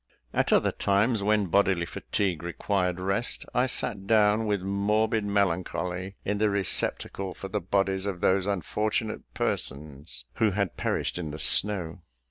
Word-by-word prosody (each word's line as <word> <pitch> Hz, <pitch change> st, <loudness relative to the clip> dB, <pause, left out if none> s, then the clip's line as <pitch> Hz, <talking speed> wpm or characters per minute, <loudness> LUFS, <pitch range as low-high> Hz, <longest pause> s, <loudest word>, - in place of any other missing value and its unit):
At -, -, +1 dB
other -, -, +4 dB
times, 105 Hz, +3 st, +1 dB
when 105 Hz, 0 st, +2 dB
bodily 95 Hz, -1 st, +2 dB
fatigue 90 Hz, -1 st, -2 dB
required 90 Hz, +1 st, -1 dB
rest, 95 Hz, +5 st, -1 dB
I 125 Hz, +1 st, +2 dB
sat 100 Hz, -5 st, -1 dB
down, 110 Hz, 0 st, +4 dB
with 100 Hz, -3 st, 0 dB
morbid 105 Hz, +3 st, +1 dB
melancholy, 95 Hz, -1 st, -1 dB
in 100 Hz, +1 st, -1 dB
the 105 Hz, 0 st, +3 dB
receptacle 100 Hz, -1 st, 0 dB
for 95 Hz, -, -7 dB
the 105 Hz, +1 st, -2 dB
bodies 95 Hz, +1 st, 0 dB
of 95 Hz, -3 st, -3 dB
those 95 Hz, 0 st, +2 dB
unfortunate 105 Hz, +3 st, -2 dB
persons 70 Hz, +2 st, -3 dB
who 110 Hz, -, +3 dB
had 100 Hz, -4 st, 0 dB
perished -, -, -1 dB
in 80 Hz, -3 st, -4 dB
the 75 Hz, -, -6 dB
snow. 90 Hz, 0 st, +2 dB
100 Hz, 145 wpm, -27 LUFS, 90-105 Hz, -, other